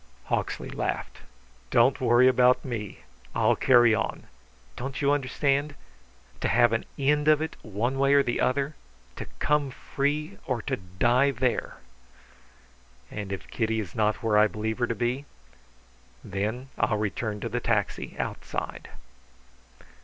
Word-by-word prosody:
Hawksley - - -2
laughed. - - -3 0.5
"Don't 120 +3 +3
worry 120 +1 +5
about 125 -1 +4
me. 110 - -5 0.3
I'll - - +3
carry 120 -3 +5
on. 110 - -2 0.5
Don't 130 +2 -5
you 140 -1 +2
understand? 140 +1 0 0.6
To - - 0
have 120 -1 +4
an 115 - -1
end 150 +2 +2
of 155 -1 +6
it, 160 +1 -4
one 115 +5 -2
way 140 +1 +4
or 140 - +6
the 120 - -1
other! 140 +3 +1 0.4
To - - -6
come 150 -2 +1
free 150 +7 -2
or 125 -3 0
to - - -2
die 120 +9 +2
there!" 130 -3 -1 1.4
"And 105 -2 -5
if 95 - -5
Kitty 110 -1 0
is 95 -7 -5
not 105 0 0
where 105 -2 +3
I 105 - +6
believe 110 +2 -3
her 120 - +1
to 115 - -2
be?" 125 +4 -1 1.0
"Then 110 +7 -3
I'll 105 0 +2
return 105 0 -2
to - - -2
the - - -1
taxi - - -1
outside." - - -5
125 Hz, 145 wpm, -27 LUFS, 110-140 Hz, 1.4 s, of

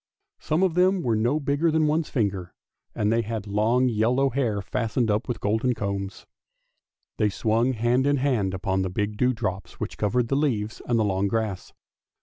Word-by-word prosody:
Some 155 +5 0
of 185 -3 +2
them 185 +1 +3
were 115 -3 +1
no 120 +8 +1
bigger 145 +3 +1
than 160 0 +2
one's 155 +1 -1
ringer, 100 -7 -1 0.4
and 105 +1 +1
they 115 - +2
had 110 -1 -4
long 110 +5 +2
yellow 125 +4 +2
hair 120 -6 0
fastened 115 +3 -1
up 105 +1 -1
with 120 - -3
golden 110 +4 0
combs. 100 -1 -4 0.9
They 105 - +2
swung 115 +5 +1
hand 120 +4 +1
in 145 0 +3
hand 120 -9 0
upon 95 +1 -1
the 95 - -1
big 105 +2 -2
dewdrops 110 -5 -2
which - - -5
covered 115 +3 +1
the 135 - 0
leaves 120 -7 -1
and 120 - +2
the 110 - +2
long 95 0 0
grass. 105 -3 -2
115 Hz, 180 wpm, -25 LUFS, 105-130 Hz, 0.9 s, them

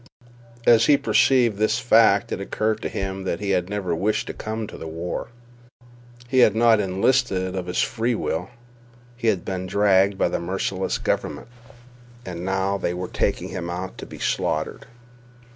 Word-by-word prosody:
As 115 -1 +6
he 145 - +6
perceived 130 -5 +3
this 110 +1 +2
fact 115 -4 +4
it - - -3
occurred 110 +2 -1
to - - -3
him 95 0 -4
that 85 - -2
he 100 -1 -2
had 90 -1 0
never 100 -4 -2
wished 105 +6 0
to - - -6
come 110 0 -4
to - - -10
the 80 - -7
war. 80 +2 -4 1.0
He 130 +2 +2
had 110 -4 +5
not 115 -1 +5
enlisted 95 -1 +1
of 90 -1 -4
his 90 - +1
free 120 +1 -1
will. 90 -3 -3 0.7
He 115 -1 -3
had 100 -6 +1
been 95 -1 -3
dragged 100 0 +3
by - - +2
the - - -2
merciless 95 +2 -2
government. - - -3 0.8
And 85 -1 -6
now 95 +1 0
they 90 - -1
were 90 0 -5
taking - - -1
him 85 - -5
out 90 +2 -5
to - - -8
be - - -10
slaughtered. - - -2
100 Hz, 175 wpm, -23 LUFS, 90-110 Hz, 1.0 s, As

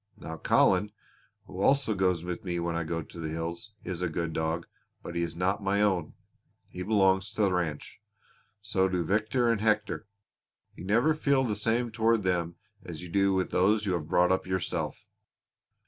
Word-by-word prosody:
Now 80 0 -7
Colin, 105 +5 +3 0.5
who 95 - -7
also 135 -1 +3
goes 90 -3 +1
with 90 0 -5
me 90 -2 -2
when 85 0 -2
I 85 - -1
go 85 0 -3
to 85 - -12
the 80 -1 -3
hills, 85 +7 -5
is 90 -2 -5
a 90 - 0
good 80 0 -3
dog, 80 +2 -1 0.4
but 85 - -6
he 85 - -1
is 85 - -3
not 95 +4 0
my 100 +1 +1
own. 95 -6 0 0.5
He 90 - -7
belongs 95 -1 +2
to 110 - 0
the 95 -2 +2
ranch. 85 -5 -3 0.6
So 95 -3 +1
do 90 -2 0
Victor 110 +7 +1
and 110 -3 0
Hector. 105 -2 0 0.7
You - - -10
never 120 +11 +3
feel 140 -3 +2
the 110 -5 -1
same 115 +3 0
toward 115 -1 +2
them 85 -2 0 0.3
as 85 -1 -8
you 90 - -8
do 100 +1 +2
with 95 -1 0
those 105 +3 +3
you 95 - 0
have 80 -3 -2
brought 90 +1 +4
up 95 0 0
yourself. 95 -1 -3
95 Hz, 190 wpm, -29 LUFS, 85-105 Hz, 0.7 s, brought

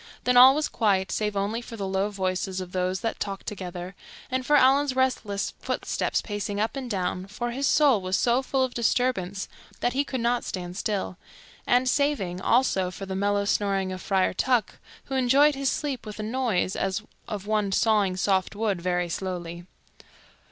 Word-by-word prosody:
Then 250 - +2
all 260 +2 +9
was 305 0 0
quiet 195 -4 +1
save 210 -1 -1
only 210 +4 -1
for 235 -1 -9
the 195 -2 -3
low 190 +2 0
voices 190 -1 -2
of 185 -1 -6
those 185 0 -1
that 225 - -3
talked 195 -1 -4
together, 180 -2 -6 0.4
and 260 0 0
for 295 +4 +3
Allan's 275 0 +4
restless 250 -6 0
footsteps - - -1
pacing 205 -1 -3
up 220 +5 -1
and 265 -3 -5
down, 185 -2 -2
for 240 +4 -4
his 270 +3 -1
soul 280 -9 +4
was 185 +1 0
so 240 +2 +2
full 265 0 0
of 255 -1 -2
disturbance 225 -5 0 0.3
that 245 - 0
he 275 +2 +1
could 265 -2 -4
not 240 +1 +1
stand 180 -1 -5
still, 200 -2 -2 0.5
and 250 +1 +3
saving, 250 -11 0
also, 195 -6 +2
for 190 +2 -7
the 190 0 -5
mellow 200 +1 +1
snoring 195 -2 0
of 185 0 -6
Friar 190 -2 +1
Tuck, 245 +4 0 0.3
who 270 - -7
enjoyed 270 +3 +4
his 275 -1 0
sleep 275 -6 -3
with 210 - -7
a - - -3
noise 220 -6 0
as 195 +3 -1 0.2
of 205 -3 -5
one 210 -2 0
sawing 200 -2 +2
soft 190 +1 +1
wood 205 -4 -1
very 180 0 0
slowly. 175 -1 -5
205 Hz, 185 wpm, -26 LUFS, 190-250 Hz, 0.5 s, all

